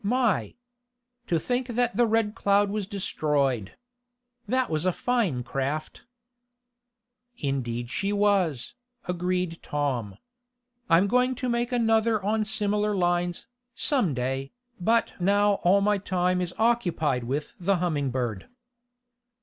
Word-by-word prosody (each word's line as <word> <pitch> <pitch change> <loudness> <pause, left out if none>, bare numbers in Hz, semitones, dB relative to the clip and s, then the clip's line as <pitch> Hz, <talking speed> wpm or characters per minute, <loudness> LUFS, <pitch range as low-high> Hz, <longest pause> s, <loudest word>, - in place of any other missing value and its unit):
My! 240 0 +1 0.7
To 170 - +2
think 245 +8 -1
that 240 -2 0
the 240 +1 +3
Red 220 -1 +1
Cloud 200 -1 +2
was 205 -2 -3
destroyed! 145 - -1 0.7
That 255 0 +1
was 155 -1 -1
a 185 - +2
fine 195 - 0
craft." 140 +5 -4 1.3
"Indeed 120 -4 -3
she 195 +1 -1
was," 200 - +1 0.3
agreed 180 -1 -2
Tom. 125 -9 -2 0.7
"I'm 170 +3 +5
going 250 +4 +2
to 250 0 -3
make 240 +1 0
another 225 -2 +2
on 215 +1 +1
similar 210 -1 +1
lines, 175 -1 0 0.3
some 245 - +1
day, 135 +2 -2 0.3
but 230 +6 +2
now 200 +2 +3
all 195 +3 +4
my 205 0 +2
time 180 -1 0
is 180 -1 -4
occupied 175 - +1
with 140 +5 -3
the 195 +2 +2
Humming 160 -6 0
Bird." 120 -6 -3
185 Hz, 125 wpm, -26 LUFS, 150-220 Hz, 1.3 s, I'm